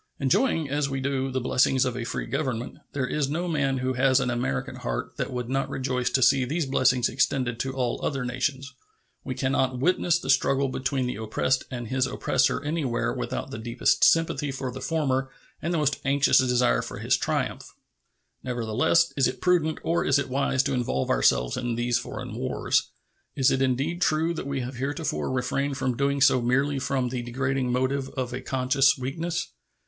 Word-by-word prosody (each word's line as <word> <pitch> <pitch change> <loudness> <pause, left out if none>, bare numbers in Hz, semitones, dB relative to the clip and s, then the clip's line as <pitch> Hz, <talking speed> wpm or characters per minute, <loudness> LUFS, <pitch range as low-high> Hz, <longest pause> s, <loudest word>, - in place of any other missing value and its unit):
Enjoying, 155 - +2
as 145 0 -1
we 135 0 -2
do, 135 0 -1
the 130 0 -1
blessings 130 +1 +2
of 125 -2 -2
a 125 - -3
free - - -3
Government, 125 -5 -3
there 140 -3 -1
is 140 +1 -1
no 170 +5 -2
man 145 -5 0
who 130 0 -1
has 130 +1 +3
an 125 -2 0
American 120 - -2
heart - - -4
that - - -3
would 125 -2 -3
not 135 +2 -1
rejoice 130 -2 -1
to 130 - +2
see 135 +1 +5
these 155 +5 -1
blessings 130 -2 +2
extended 125 -2 0
to 130 +1 -2
all 125 -3 -2
other 135 -3 -1
nations. 130 +2 -2 0.5
We 130 - -4
can 130 +1 -1
not 130 -2 +1
witness 175 +4 +2
the 135 -5 0
struggle 135 0 +2
between 130 0 -1
the 125 - -3
oppressed 110 +4 0
and 120 -2 -5
his 130 -1 +1
oppressor - - +1
anywhere 145 -6 -1
without - - -4
the 110 - -6
deepest 120 +2 +1
sympathy 165 -3 +3
for 130 -1 -4
the 130 +1 -8
former 135 -5 0 0.3
and 170 - -2
the 170 - +1
most 150 -3 +1
anxious 140 +1 +4
desire 125 -1 +2
for - - -7
his - - +2
triumph. - - -2 0.7
Nevertheless, 120 +4 +1
is 135 -3 +3
it - - -4
prudent 170 -3 +2
or 170 +1 +1
is 140 - +3
it 140 - -2
wise 135 0 +1
to - - -1
involve 120 - -1
ourselves - - +2
in 120 -2 -2
these 120 +1 +1
foreign - - -7
wars? - - 0 0.5
Is 135 0 +3
it 135 - +1
indeed 135 +7 0
true 165 -1 +2
that 160 - -5
we 140 -1 -2
have 125 +1 -6
heretofore 145 +4 -2
refrained 135 +2 -1
from 130 -3 -1
doing 140 +2 0
so 130 -2 +5
merely 135 +4 +1
from 130 -1 -1
the 125 0 -3
degrading 130 +1 -1
motive 130 +2 0
of 125 -2 -2
a 125 - -4
conscious 135 +2 +2
weakness? 165 +7 -3
130 Hz, 195 wpm, -26 LUFS, 125-140 Hz, 0.7 s, see